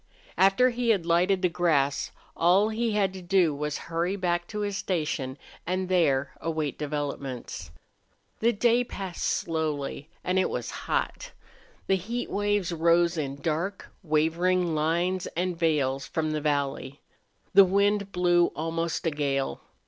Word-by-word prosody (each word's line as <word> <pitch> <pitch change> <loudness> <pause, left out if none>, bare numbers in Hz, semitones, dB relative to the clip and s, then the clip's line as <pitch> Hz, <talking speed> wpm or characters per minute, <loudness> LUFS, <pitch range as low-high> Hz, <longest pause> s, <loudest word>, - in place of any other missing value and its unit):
After 195 +8 +4
he 240 0 -1
had 195 -7 +2
lighted 180 +3 +2
the - - +5
grass 155 -6 +1 0.3
all 185 +5 +4
he 225 0 -1
had 195 -3 +1
to 190 - -8
do 175 -3 +3
was 150 0 -3
to - - -5
hurry 170 +3 -1
back 175 -2 -1
to 210 -1 -4
his 205 -1 -2
station 150 -8 -2 0.3
and 185 +1 -1
there 140 -7 +2
await 155 -3 -2
developments. 140 - -4 0.7
The 230 +2 +3
day 240 +2 +3
passed 195 -7 -6
slowly, 155 -2 -2
and 185 +1 +1
it 185 - +1
was 120 -1 -4 0.2
hot. - - -2 0.5
The 195 - +2
heat 235 +7 -4
waves 205 -3 0
rose 170 +1 +3
in 140 -3 -4
dark, 170 +5 -2
wavering 170 +2 +1
lines 170 +4 0
and 180 0 0
veils 145 -5 0
from 155 -1 -1
the 155 -1 -2
valley. 140 -2 -2 0.5
The 195 +1 +9
wind 200 +1 +1
blew 175 -1 +3
almost 165 +2 -2
a 165 - +2
gale. 140 - -1
170 Hz, 150 wpm, -27 LUFS, 150-190 Hz, 0.7 s, The